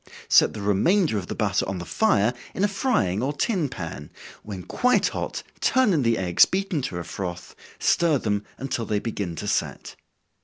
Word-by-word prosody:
Set - - +5
the 105 - -5
remainder 150 - +2
of 90 - -8
the - - -4
butter - - +1
on 95 - -3
the 90 - -6
fire, 125 - +2 0.2
in 190 - -1
a - - +5
frying 195 - 0
or 135 +3 0
tin 155 - 0
pan, 80 - -7 0.3
when 95 -4 -7
quite 250 - +2
hot, - - -4 0.2
turn 260 -6 +3
in 155 - +2
the 115 -2 +2
eggs 90 -2 +4
beaten 190 -5 -2
to 95 -9 -4
a 85 - -4
froth, 90 -1 -6 0.2
stir 165 -4 +3
them 105 -4 -1
until 125 -4 -3
they 105 - 0
begin 100 -5 -3
to - - -5
set. - - -2
115 Hz, 190 wpm, -24 LUFS, -, 0.3 s, Set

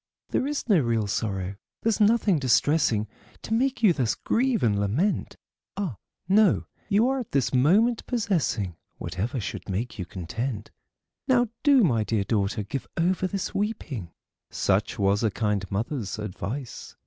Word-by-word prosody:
There 265 - 0
is 295 -3 -3
no 200 -7 +5
real 115 -5 +1
sorrow, 100 -2 -2 0.3
there's 225 -1 +1
nothing 210 -5 +4
distressing, 130 -4 +2 0.4
To 220 - -3
make 255 +1 +1
you 200 -5 +7
thus 125 -7 0
grieve 250 -1 +1
and 105 -3 +2
lament. 125 - 0 0.4
Ah! 180 - -3 0.3
no; 200 +1 +4 0.2
you 215 +4 +4
are 270 0 +1
just 240 - -5
at - - -47
this 135 -2 +1
moment 200 - +3
possessing 165 - 0 0.2
Whatever 95 +9 -3
should 105 - -6
make 105 +5 -3
you 90 - -4
content. 105 +6 -4 0.6
Now 245 -3 +3
do, 280 -5 +5
my 120 - +3
dear 105 -2 0
daughter, 105 +1 0
give 130 +6 -5
over 185 +2 +1
this 195 0 -3
weeping," 155 - -3 0.4
Such - - 0
was 100 +1 +2
a 110 - +2
kind 105 -2 -1
mother's 110 0 -2
advice. 110 +5 -6
130 Hz, 155 wpm, -26 LUFS, -, 0.6 s, you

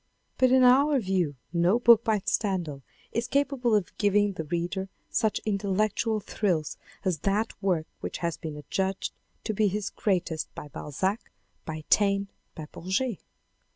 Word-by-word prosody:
But 255 0 +5
in 260 0 +6
our 275 +3 +5
view 185 - 0 0.2
no 175 +5 +3
book 235 -2 +6
by 215 -3 +1
Stendhal 175 -9 -1 0.3
is 235 +1 -1
capable 275 -5 +1
of 205 -4 -1
giving 205 -1 +3
the 160 -3 -5
reader 175 +4 -2 0.2
such 220 -2 +1
intellectual 210 +2 0
thrills 180 -7 -1 0.3
as 180 -5 +1
that 205 +6 0
work 180 -5 +1
which - - -4
has 170 -2 -2
been 155 -3 -7
adjudged 190 +6 -2 0.3
to 215 - -2
be 215 +1 +2
his 200 +1 -2
greatest 175 -5 -1
by 150 - -8
Balzac, 185 - -3 0.3
by 155 -1 -5
Taine, 200 -1 +3 0.3
by 155 - -6
Bourget. 190 +5 -2
195 Hz, 150 wpm, -27 LUFS, 175-220 Hz, 0.3 s, in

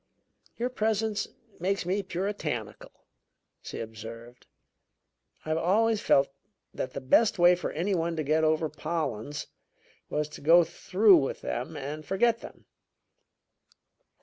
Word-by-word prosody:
"Your 245 +2 -1
presence 220 -2 0 0.3
makes 190 +1 -1
me 190 +3 0
puritanical," 175 - -5 0.6
she - - -7
observed. 115 +2 -9 1.0
"I - - -6
have 160 +1 +1
always 215 +5 +2
felt 135 0 +4 0.4
that - - -4
the - - -4
best 205 - +3
way 175 0 +7
for 180 - -3
any 180 +6 -1
one 170 -1 0
to 155 - -2
get 155 +2 +2
over 155 0 +2
Pollens 150 -4 -3 0.6
was 150 0 -1
to - - -11
go 170 +4 +7
through 185 +4 +4
with 135 -3 -2
them 140 +6 -4
and 145 +2 -5
forget 230 +7 +2
them." - - -12
165 Hz, 130 wpm, -28 LUFS, 145-200 Hz, 1.0 s, way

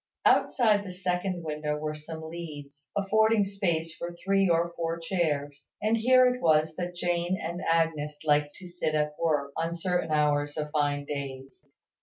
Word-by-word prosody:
Outside 215 -5 +4
the 190 - -7
second 180 -1 -2
window 150 -1 -2
were 155 0 -3
some 160 +1 -8
leads, 150 -3 -9
affording 220 +1 +3
space 170 -5 -1
for 175 0 -6
three 195 -1 +3
or 170 0 +2
four 165 0 -2
chairs: 145 -5 -2
and 215 +2 +2
here 255 +3 +5
it 250 - -8
was 155 -1 +3
that 180 -1 -4
Jane 175 +1 0
and 170 +2 -4
Agnes 160 -3 +1
liked 150 -1 +2
to 190 - -11
sit 175 -3 -2
at 150 0 +1
work, 145 -4 +1
on 165 +1 -2
certain 175 -1 -1
hours 145 -1 +1
of 150 -1 -3
fine 145 -2 0
days. 140 0 -7
165 Hz, 165 wpm, -28 LUFS, 150-180 Hz, -, here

